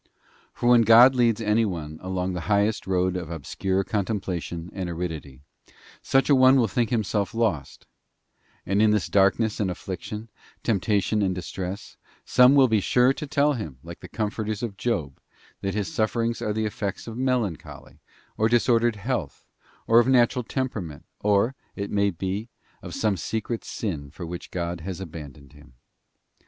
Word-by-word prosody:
For 120 - -3
when 120 -1 +7
God 115 +4 +8
leads 115 -3 +2
any 110 +1 +2
one 80 -6 -4
along 95 0 -2
the 90 - -3
highest 105 +1 +1
road 90 -1 +1
of 90 -3 -4
obscure 95 +5 -2
contemplation 95 -5 -3
and 95 -3 -4
aridity, 80 -6 -5 0.6
such 135 0 +2
an 140 - +5
one 130 +1 +7
will 125 -4 +3
think 115 +3 0
himself 105 -4 -1
lost; 100 - -1 0.8
and 100 +2 +1
in 110 - +5
this 105 -3 +2
darkness 100 +2 +2
and 100 -3 0
affliction, 95 +4 -6 0.4
temptation 105 0 +1
and 95 -2 0
distress, 95 +3 -6 0.3
some 125 +2 +6
will 135 -2 +6
be 110 -2 +2
sure 125 +6 +3
to 150 +1 -6
tell 145 +2 +2
him, 95 - -6
like 85 0 -9
the - - -10
comforters 110 0 -3
of 110 -4 -3
Job,f 85 - -3 0.4
that 100 0 -2
his 105 -2 -2
sufferings 115 +1 0
are 105 - -1
the 110 +1 -1
effects 100 -2 -4
of 115 - -7
melancholy, 125 - -3 0.4
or 110 +1 +2
disordered 120 -1 +3
health, 105 - -4 0.4
or 115 +1 +6
of 120 - +3
natural 125 -1 +3
temperament, 110 - -4
or, 105 +4 +2 0.2
it 100 0 -4
may 100 0 +2
be, 95 +5 -4 0.3
of - - -8
some 105 -3 +1
secret 110 +7 -3
sin 80 -10 -4
for 85 +5 -8
which 85 +1 -7
God 85 -1 -4
has 95 +1 -5
abandoned 75 -5 -10
him. 75 -3 -18
105 Hz, 165 wpm, -25 LUFS, 90-115 Hz, 0.8 s, God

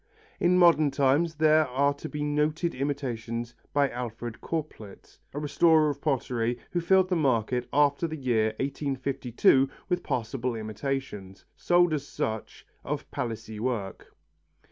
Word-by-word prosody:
In 180 +1 +3
modern 165 -4 +5
times 140 +4 +2
there 155 0 +4
are 140 +3 +1
to 145 +2 -8
be 150 -1 -4
noted 150 +3 0
imitations 120 -4 -3 0.2
by 145 -1 +3
Alfred 120 -1 -6
Corplet, 150 -11 -6
a - - -8
restorer 155 +1 +3
of 140 0 -9
pottery 120 -5 -1
who 175 - 0
filled 190 +2 +4
the 180 - +1
market 125 -5 0
after 145 +3 +2
the 160 0 -5
year 120 -6 +1
1852 135 -1 +1 0.2
with 180 0 0
passable 120 +1 -2
imitations, 110 -3 -5
sold 175 -1 +3
as 145 -2 -3
such, 110 -1 -4 0.2
of - - -5
Palissy 110 -2 -5
work. 110 -6 -4
140 Hz, 135 wpm, -27 LUFS, 120-155 Hz, 0.2 s, modern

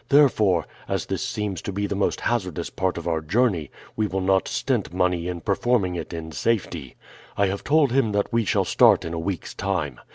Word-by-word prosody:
Therefore, 110 - +4 0.2
as - - -1
this - - -3
seems 100 -5 -3
to - - -4
be 100 +2 -2
the 100 - -2
most 100 0 0
hazardous 90 -8 -2
part 95 -1 -1
of 85 - -5
our 80 -2 0
journey, 90 - +1 0.3
we 110 -1 +1
will 95 0 -2
not 95 0 +2
stint - - -1
money 90 -1 0
in 90 -1 -4
performing 100 -2 +1
it 85 - -5
in 80 -1 -6
safety. 85 - -2 0.4
I 100 - +4
have 100 +1 -2
told 145 -2 +3
him 130 -4 +2
that 100 +3 0
we 115 0 +3
shall - - +1
start - - +5
in 80 - -4
a 85 - -2
week's 90 +1 -4
time. 85 -9 -2
95 Hz, 205 wpm, -24 LUFS, 85-105 Hz, 0.4 s, start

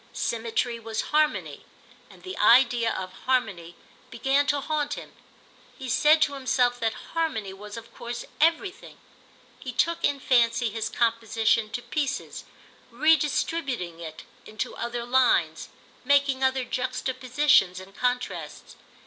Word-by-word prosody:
Symmetry 235 +1 -2
was 225 -1 -4
harmony, 305 0 +1 0.5
and - - -17
the 375 0 -6
idea 240 -2 +5
of 185 -1 -5
harmony 195 -10 0 0.3
began 270 +4 +1
to 285 +2 +2
haunt 295 0 -2
him; - - -10 0.7
he 265 - -7
said 300 +5 +4
to 290 - -1
himself 250 -2 +1
that 225 -1 0 0.2
harmony 305 -13 -2
was 210 +2 -9
of 230 0 -11
course 240 0 -6
everything. 335 +4 0 0.6
He 255 - -6
took, 335 +7 0
in 285 -1 +1
fancy, 235 -2 +2
his 225 +1 -3
composition 225 -1 +1
to 245 - -4
pieces, 280 -2 -3 0.4
redistributing 275 - +1
it 160 -2 -8 0.2
into 215 0 -5
other 235 0 -4
lines, 240 -11 +2 0.3
making 275 0 +2
other 260 0 +2
juxtapositions 255 -5 +1
and 190 +1 -13
contrasts. 250 0 -3
250 Hz, 125 wpm, -26 LUFS, 225-280 Hz, 0.7 s, idea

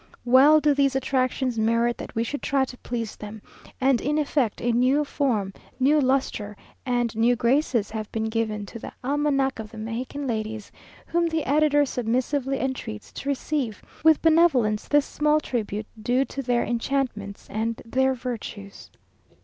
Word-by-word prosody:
"Well 270 +5 +7
do 300 -1 +3
these 275 -1 +2
attractions 255 -2 0
merit 230 +2 +2
that - - -8
we 225 - +1
should 285 +5 -4
try 275 -1 +1
to 250 - -11
please 230 -3 -4
them; 210 +1 -8 0.4
and 265 -2 +3
in 295 +3 0
effect 285 -6 0
a 240 - 0
new 255 +5 +3
form, 225 -10 -1 0.3
new 290 +3 +4
lustre, 255 -6 0 0.3
and 240 -2 0
new 235 +2 +3
graces 240 -2 +1
have 215 -1 -5
been 220 - -2
given 220 -2 -2
to 230 - -9
the - - -8
'Almanac 275 -1 +1
of 215 -1 -6
the 220 - -12
Mexican 240 +6 -4
Ladies,' 220 -3 -4 0.3
whom 340 0 +1
the 320 -2 -1
editor 290 +1 +3
submissively 260 +3 -1
entreats 235 -5 -4
to 280 - -5
receive 275 -5 -2 0.2
with 320 -1 +5
benevolence 305 -10 +3
this 290 -1 +3
small 300 0 +2
tribute 215 -6 -3 0.2
due 255 +4 +2
to 275 - -5
their 245 -2 +1
enchantments 235 -4 -2
and 225 +2 -2
their 265 +2 +1
virtues!" 230 -5 -7
250 Hz, 160 wpm, -25 LUFS, 225-280 Hz, 0.4 s, Well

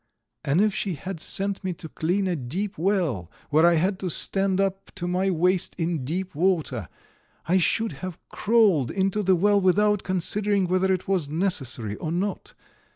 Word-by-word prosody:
And 145 +7 +2
if 210 -1 +2
she 190 -3 -2
had 180 +4 -7
sent 195 +4 -3
me 185 -1 -2
to 160 - -9
clean 180 +5 -1
a 180 - 0
deep 175 +10 -4
well, 160 - -1 0.2
where 160 +3 +5
I 175 - +4
had 185 +4 0
to 185 - -3
stand 195 +3 +4
up 195 0 -1
to 175 -3 -4
my 185 +2 0
waist 180 +1 +1
in 165 -4 -2
deep 180 +6 -3
water, 155 - 0 0.6
I 185 +3 +2
should 225 +5 +1
have 185 -3 -6
crawled 205 - +2
into 195 +2 0
the 190 -2 +3
well 200 +3 +3
without 205 +2 +3
considering 195 +2 0
whether 185 +1 +1
it 185 -1 -1
was 185 -7 0
necessary 135 - -2
or 155 - -4
not. 195 +4 -3
185 Hz, 175 wpm, -25 LUFS, 165-195 Hz, 0.6 s, where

